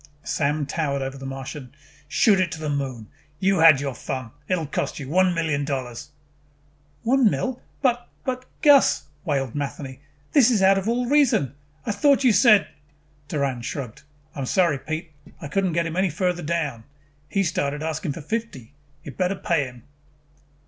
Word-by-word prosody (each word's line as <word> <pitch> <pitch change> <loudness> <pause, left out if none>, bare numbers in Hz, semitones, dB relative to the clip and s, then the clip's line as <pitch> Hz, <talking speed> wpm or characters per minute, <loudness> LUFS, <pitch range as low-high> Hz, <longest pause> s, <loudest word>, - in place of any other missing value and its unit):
Sam 145 0 0
towered 140 -2 -1
over 135 0 -4
the 135 - -6
Martian. 135 0 -7 0.3
"Shoot 195 +6 +4
it 180 -4 +1
to 160 - -7
the 155 -2 -2
Moon. 135 -5 -3 0.3
You 190 -1 +2
had 160 -4 +8
your 140 -1 -3
fun. 130 -2 -5 0.2
It'll 180 -4 0
cost 140 -1 -3
you. 140 - -6
One 180 +4 +3
million 160 -4 0
dollars." 130 -3 -4 0.9
"One 255 -1 +4
mil 255 +4 -2 0.2
But 245 -2 +1 0.2
but 255 -1 -3 0.2
Gus," 290 -3 +6 0.2
wailed 135 -5 -1
Matheny, 140 -2 -5 0.3
"this 260 -5 +6
is 215 -6 +2
out 195 0 +5
of 195 - -5
all 245 +2 +1
reason! 260 - +3 0.3
I 225 - 0
thought 275 +7 +3
you 250 -4 +5
said 215 -3 +6 0.3
" 145 -1 -36
Doran 140 -4 -1
shrugged. 125 +1 -6 0.3
"I - - -8
am 135 - -2
sorry, 170 -5 +2
Pete. 160 +2 -5 0.3
I 150 - -6
could 195 +6 0
not 175 -3 -1
get 170 0 +1
him 165 0 -4
any 190 +1 +2
farther 180 +2 -1
down. 150 -8 -2 0.4
He 195 - +1
started 145 -3 -1
asking 160 -1 -2
fifty. 155 - -5 0.3
You 150 - -7
better 180 +9 -1
pay 165 -6 0
him." 125 -2 -11
155 Hz, 175 wpm, -24 LUFS, 140-195 Hz, 0.9 s, had